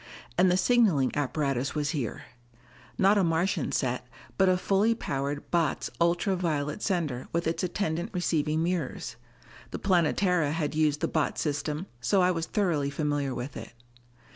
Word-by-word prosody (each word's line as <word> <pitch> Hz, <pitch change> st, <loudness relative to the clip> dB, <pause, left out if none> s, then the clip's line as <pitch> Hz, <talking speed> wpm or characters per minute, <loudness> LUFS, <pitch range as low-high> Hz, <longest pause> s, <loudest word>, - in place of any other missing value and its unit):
And 180 Hz, +1 st, +4 dB
the 180 Hz, -, +3 dB
signaling 190 Hz, -, +3 dB
apparatus 140 Hz, -2 st, -1 dB
was 145 Hz, -1 st, 0 dB
here! 135 Hz, -9 st, -3 dB, 0.7 s
Not 200 Hz, +2 st, +4 dB
a -, -, +3 dB
Martian 170 Hz, +2 st, 0 dB
set, 125 Hz, -1 st, -1 dB, 0.3 s
but 190 Hz, -1 st, +4 dB
a 185 Hz, -, +3 dB
fully 200 Hz, +5 st, +2 dB
powerful 140 Hz, -5 st, -3 dB
Botz 165 Hz, -4 st, 0 dB
ultra 175 Hz, +3 st, +2 dB
violet 155 Hz, -2 st, -2 dB
sender 160 Hz, -, -1 dB
with 170 Hz, +1 st, -1 dB
its 165 Hz, +1 st, -1 dB
attendant 175 Hz, 0 st, -2 dB
receiving 160 Hz, -4 st, 0 dB
mirrors. 165 Hz, -9 st, -2 dB, 0.5 s
The -, -, -5 dB
Planetara 175 Hz, -3 st, +2 dB
had 155 Hz, -3 st, -1 dB
used 150 Hz, -1 st, +1 dB
the -, -, +1 dB
Botz 155 Hz, -2 st, -1 dB
system, 150 Hz, +2 st, -2 dB
so 185 Hz, -, +2 dB
I 180 Hz, -, +4 dB
was 165 Hz, -2 st, -2 dB
thoroughly 165 Hz, -9 st, 0 dB
familiar 145 Hz, -2 st, -1 dB
with 125 Hz, +4 st, -5 dB
it. 115 Hz, +1 st, -8 dB
160 Hz, 155 wpm, -28 LUFS, 145-180 Hz, 0.7 s, And